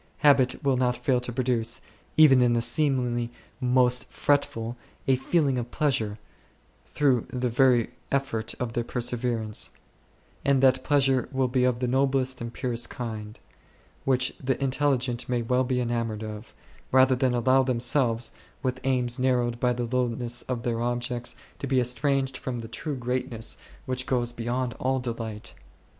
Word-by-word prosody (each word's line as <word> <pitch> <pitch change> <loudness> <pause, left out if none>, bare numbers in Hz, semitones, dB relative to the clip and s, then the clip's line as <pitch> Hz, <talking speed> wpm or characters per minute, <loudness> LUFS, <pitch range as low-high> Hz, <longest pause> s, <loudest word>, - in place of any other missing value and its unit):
Habit 135 -3 +4
will 135 -2 +2
not 125 -1 +1
fail 125 +1 +1
to 125 0 -4
produce, 120 -2 0 0.4
even 140 -5 +7
in 120 -1 +4
the 120 - +2
seemingly 120 -2 +1 0.3
most 125 -1 +3
fretful 120 -5 0 0.3
6, 135 - +4
a 130 +1 -1
feeling 140 -5 +2
of 120 0 -5
pleasure 120 -9 0 0.7
through 135 -6 +1
the 125 -1 -1
very 120 -1 +3 0.2
effort 135 -5 -1
of 120 -2 -3
their 120 - 0
perseverance; 120 -2 -1 0.7
and 140 -1 +3
that 130 -1 +4
pleasure 135 -2 +2
will 130 -1 +1
be 125 0 +2
of 125 -1 0
the 125 - +1
noblest 130 0 +1
and 115 0 -4
purest 120 -1 -2
kind; 110 -3 -6 0.6
which 130 -1 +2
the 130 0 0
intelligent 130 -3 0
may 120 -2 0
well 125 +2 +2
be 130 0 -1
•enamoured 115 -3 -1
of, 110 0 -8 0.4
rather 130 0 +5
than 125 -1 +1
allow 130 +2 +4
themselves, 120 -2 +1 0.3
with 130 -1 -2
aims 125 -2 +1
narrowed 125 -2 +1
by 125 0 +2
the 120 0 -2
lowness 120 0 0
of 120 -2 -2
their 115 -2 -1
objects, 120 0 -2 0.2
to 140 - -4
be 130 -1 +2
estranged 135 +1 0
from 120 -3 -4
the 115 - -7
true 145 +6 -4
greatness 125 -2 -2 0.3
which 130 0 -3
goes 120 -2 0
beyond 120 +1 -2
all 130 +1 +1
thought. 115 -3 -5
125 Hz, 155 wpm, -26 LUFS, 120-130 Hz, 0.7 s, even